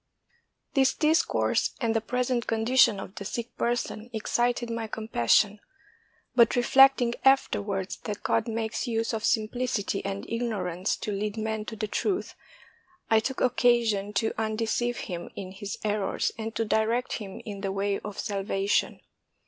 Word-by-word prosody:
This 265 Hz, -2 st, +3 dB
discourse 315 Hz, +1 st, +2 dB
and 230 Hz, -4 st, 0 dB
the 225 Hz, -, +2 dB
present 250 Hz, +1 st, -1 dB
condition 225 Hz, -1 st, +4 dB
of 190 Hz, -, -8 dB
the 200 Hz, -, -7 dB
sick 235 Hz, +4 st, -5 dB
person 240 Hz, -1 st, -2 dB
excited 240 Hz, +2 st, 0 dB
my 230 Hz, -1 st, -3 dB
compassion; 210 Hz, -, +2 dB, 0.7 s
but 235 Hz, -2 st, +5 dB
reflecting 250 Hz, 0 st, +5 dB
afterwards 205 Hz, -8 st, +2 dB
that 210 Hz, -1 st, -4 dB
God -, -, +1 dB
makes 225 Hz, +2 st, -2 dB
use 230 Hz, 0 st, -1 dB
of 220 Hz, -1 st, -2 dB
simplicity 220 Hz, -3 st, 0 dB
and 195 Hz, 0 st, -4 dB
ignorance 200 Hz, -6 st, -1 dB
to 210 Hz, -, -4 dB
lead 205 Hz, +2 st, -3 dB
men 220 Hz, -1 st, -2 dB
to 220 Hz, -, -6 dB
the 215 Hz, 0 st, -2 dB
truth, 375 Hz, -, -1 dB, 0.8 s
I 220 Hz, -, +6 dB
took 260 Hz, +4 st, -3 dB
occasion 235 Hz, -5 st, +2 dB
to 220 Hz, +2 st, 0 dB
undeceive 225 Hz, +2 st, -1 dB
him 175 Hz, -2 st, -6 dB
in 185 Hz, -2 st, -6 dB
his 195 Hz, +1 st, -6 dB
errors 205 Hz, -2 st, 0 dB
and 225 Hz, 0 st, -5 dB
to 225 Hz, -, 0 dB
direct 225 Hz, +3 st, +1 dB
him 195 Hz, -3 st, -8 dB
in 200 Hz, -2 st, -6 dB
the 195 Hz, -1 st, -2 dB
way 200 Hz, 0 st, -1 dB
of 205 Hz, -1 st, -8 dB
salvation. 200 Hz, -2 st, -1 dB
220 Hz, 150 wpm, -27 LUFS, 205-240 Hz, 0.8 s, I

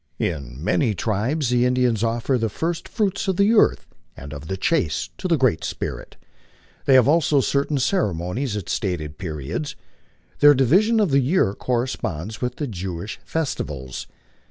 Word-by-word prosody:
In 70 Hz, -7 st, -3 dB
many 110 Hz, -, +1 dB
tribes 115 Hz, -, -1 dB
the 120 Hz, 0 st, +3 dB
Indians 125 Hz, -3 st, +2 dB
offer 115 Hz, +3 st, 0 dB
the 115 Hz, -1 st, 0 dB
first 165 Hz, +10 st, -3 dB
fruits 200 Hz, -3 st, -1 dB
of 190 Hz, -2 st, 0 dB
the 200 Hz, +3 st, +4 dB
earth 215 Hz, -, +3 dB, 0.3 s
and 70 Hz, +3 st, -8 dB
of 70 Hz, +1 st, -8 dB
the 95 Hz, -, -3 dB
chase 95 Hz, -, 0 dB
to -, -, -2 dB
the 170 Hz, -3 st, +3 dB
Great 125 Hz, -, +2 dB
Spirit. -, -, -5 dB, 0.7 s
They 135 Hz, -, +5 dB
have 130 Hz, -1 st, +6 dB
also 150 Hz, -1 st, +3 dB
certain 140 Hz, +2 st, +1 dB
ceremonies 110 Hz, -, -1 dB
at 100 Hz, -, -6 dB
stated 85 Hz, -8 st, -3 dB
periods. 80 Hz, -, -4 dB, 0.6 s
Their 145 Hz, 0 st, +8 dB
division 190 Hz, -, +4 dB
of 200 Hz, -7 st, +2 dB
the 135 Hz, -, +5 dB
year 135 Hz, -, +2 dB
corresponds 110 Hz, -6 st, -3 dB
with 125 Hz, 0 st, -2 dB
tho 150 Hz, -, -3 dB
Jewish 95 Hz, -3 st, -5 dB
festivals. 70 Hz, -, -4 dB
125 Hz, 155 wpm, -23 LUFS, 90-150 Hz, 0.7 s, Their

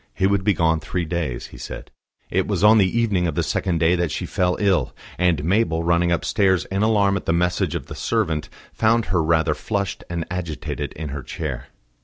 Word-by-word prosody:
He 95 Hz, -, +1 dB
would 100 Hz, 0 st, +2 dB
be 105 Hz, -1 st, +2 dB
gone 80 Hz, 0 st, +2 dB
three 85 Hz, +2 st, -3 dB
days, 80 Hz, -7 st, -3 dB
he -, -, -10 dB
said. -, -, -8 dB, 0.4 s
It -, -, +1 dB
was -, -, -1 dB
on 110 Hz, +1 st, +7 dB
the 95 Hz, +4 st, +2 dB
evening 100 Hz, -7 st, +1 dB
of 80 Hz, -, -3 dB
the 85 Hz, -, +1 dB
second 85 Hz, +2 st, -1 dB
day 80 Hz, +1 st, +3 dB
that 85 Hz, -2 st, 0 dB
she -, -, -3 dB
fell 90 Hz, -1 st, 0 dB
ill; 100 Hz, -4 st, +1 dB, 0.2 s
and 90 Hz, -5 st, +2 dB
Mabel, 85 Hz, -2 st, +1 dB
running 85 Hz, +1 st, +2 dB
upstairs, 95 Hz, +1 st, +2 dB
in 95 Hz, +1 st, 0 dB
alarm 100 Hz, -3 st, +3 dB
at -, -, -8 dB
the 85 Hz, -, +2 dB
message 90 Hz, +1 st, 0 dB
of -, -, -4 dB
the -, -, -8 dB
servant, 80 Hz, -2 st, -1 dB, 0.2 s
found 115 Hz, +1 st, +2 dB
her 90 Hz, -, +3 dB
rather 80 Hz, 0 st, +2 dB
flushed 100 Hz, +6 st, -3 dB
and 85 Hz, -1 st, -3 dB
agitated 85 Hz, -4 st, -4 dB
in 75 Hz, -1 st, -6 dB
her 70 Hz, 0 st, -5 dB
chair. 65 Hz, 0 st, -5 dB
85 Hz, 210 wpm, -22 LUFS, 80-100 Hz, 0.4 s, on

